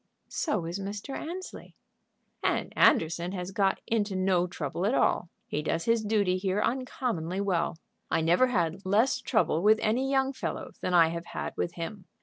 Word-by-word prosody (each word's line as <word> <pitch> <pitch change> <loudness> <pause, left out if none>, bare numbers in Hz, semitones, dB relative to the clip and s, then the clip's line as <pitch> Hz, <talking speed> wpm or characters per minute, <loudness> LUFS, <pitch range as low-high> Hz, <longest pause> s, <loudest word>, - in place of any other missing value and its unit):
"So 210 - -1
is 170 +4 -4
Mr. 205 +7 -5
Annesley." 360 +4 -7 0.7
"And - - 0
Anderson 170 +3 +3
has 180 0 -4
got 195 0 +1
into 210 -3 0
no 185 -1 +2
trouble 175 +2 -3
at 245 - +2
all. 175 - +2 0.2
He 150 - -2
does 165 +2 -1
his 230 -1 +2
duty 205 -4 +2
here 190 +1 0
uncommonly 230 -8 -1
well. 180 -4 0 0.3
I - - +1
never 175 +10 +4
had 180 -5 -1
less 210 +7 +2
trouble 215 -8 +1
with 215 +3 +5
any 250 +5 +1
young 270 0 +2
fellow - - -4
than 180 - 0
I 165 -2 +6
have 170 +1 -5
had - - -5
with 170 - -2
him. 180 +3 -6
195 Hz, 170 wpm, -28 LUFS, 175-220 Hz, 0.7 s, I